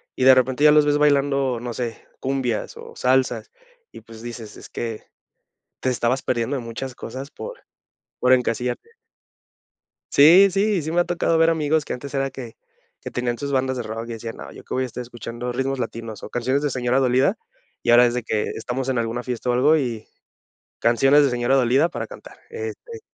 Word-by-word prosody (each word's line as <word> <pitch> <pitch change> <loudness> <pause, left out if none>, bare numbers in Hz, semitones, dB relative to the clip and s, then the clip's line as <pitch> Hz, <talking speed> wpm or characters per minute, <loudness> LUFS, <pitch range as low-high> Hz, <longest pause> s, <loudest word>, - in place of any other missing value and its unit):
y 130 - -1
de 130 - +9
repente 130 +2 +2
ya 150 - +8
los 150 0 +5
ves 145 0 +2
bailando, 140 -3 +2
no 120 0 -5
sé, 120 -2 -5
cumbias, 130 -4 -2
o - - -11
salsas, 130 - +1 0.4
y - - -12
pues 115 -1 -13
dices: 115 -3 -8
"Es - - -12
que 115 -2 -5 0.8
te - - -1
estabas 125 +1 0
perdiendo 120 +3 -1
de 125 - -4
muchas 120 +3 -6
cosas 130 +4 -7
por - - -9 0.6
por 125 - +3
encasillarte". 125 - -2 1.2
Sí, 175 +7 +8
sí. 200 +2 +1
Y - - 0
sí 155 +1 -4
me 175 +1 +3
ha - - +2
tocado 170 -1 +1
ver 165 0 +4
amigos 155 -1 +1
que - - -4
antes 140 +3 -7
era 135 -1 0
que 125 -4 -9 0.4
que - - -7
tenían 120 -1 -2
sus 140 -1 -4
bandas 130 0 0
de 120 - -3
rock, 115 +1 -6
y - - -4
decían: 115 0 -6
"No, - - -9
¿yo - - -12
qué - - -6
voy 130 - 0
a - - -1
estar 125 - -7
escuchando 120 0 -6
ritmos 135 +1 -2
latinos 115 -3 -5
o - - -7
canciones 130 +4 0
de 145 - +1
señora 125 0 +1
dolida?". 130 - +2 0.4
Y - - +2
ahora, 120 +1 +7
es 120 - +1
de 125 -2 -2
que 110 -2 -1
estamos 130 +2 -3
en 130 - 0
alguna 115 +1 -2
fiesta, 125 0 -3
o - - +3
algo 145 +6 +4
y 120 -6 -3 0.7
canciones 135 +5 +4
de 140 - +3
señora 120 +1 +1
dolida 135 +5 +3
para - - -5
cantar. - - -12
Este 450 0 -7
130 Hz, 205 wpm, -22 LUFS, 120-145 Hz, 1.2 s, de